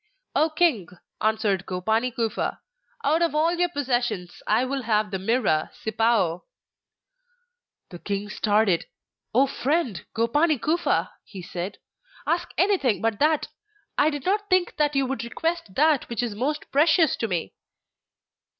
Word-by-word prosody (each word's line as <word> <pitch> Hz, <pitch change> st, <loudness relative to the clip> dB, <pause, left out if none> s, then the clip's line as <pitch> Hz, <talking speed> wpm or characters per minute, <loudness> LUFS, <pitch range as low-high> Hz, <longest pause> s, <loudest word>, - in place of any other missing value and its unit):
'O 315 Hz, -, +3 dB
king!' 310 Hz, -, +2 dB, 0.3 s
answered 215 Hz, -3 st, +1 dB
Gopani 220 Hz, +7 st, 0 dB
Kufa, 230 Hz, -2 st, -2 dB, 0.4 s
'out 320 Hz, -3 st, +2 dB
of 335 Hz, -3 st, +1 dB
all 320 Hz, +3 st, +3 dB
your 355 Hz, 0 st, +1 dB
possessions 240 Hz, -, -2 dB
I 225 Hz, +4 st, +3 dB
will 270 Hz, +1 st, -2 dB
have 215 Hz, -3 st, 0 dB
the 190 Hz, -, -2 dB
Mirror, 195 Hz, -7 st, +1 dB
Sipao.' 220 Hz, -6 st, +1 dB, 1.5 s
The 175 Hz, -, -9 dB
king 200 Hz, +2 st, -3 dB
started. 210 Hz, -3 st, +1 dB, 0.5 s
'O 265 Hz, +3 st, +6 dB
friend, 270 Hz, -, -1 dB
Gopani 290 Hz, +8 st, +2 dB
Kufa,' 330 Hz, +8 st, 0 dB
he 190 Hz, -3 st, -10 dB
said, 180 Hz, +2 st, -5 dB, 0.5 s
'ask 345 Hz, +1 st, 0 dB
anything 355 Hz, -, +2 dB
but 225 Hz, -2 st, -1 dB
that! 305 Hz, 0 st, +2 dB, 0.5 s
I 295 Hz, -, +4 dB
did 290 Hz, -3 st, -5 dB
not 410 Hz, +2 st, 0 dB
think 370 Hz, -1 st, +2 dB
that 295 Hz, -1 st, +1 dB
you 275 Hz, -1 st, +2 dB
would 255 Hz, -3 st, -3 dB
request 325 Hz, -, -3 dB
that 300 Hz, -1 st, +3 dB
which 235 Hz, 0 st, -2 dB
is 235 Hz, -3 st, -2 dB
most 285 Hz, +8 st, -3 dB
precious 315 Hz, +3 st, +4 dB
to 225 Hz, -, -1 dB
me. 175 Hz, -, -3 dB
245 Hz, 140 wpm, -25 LUFS, 210-310 Hz, 1.5 s, O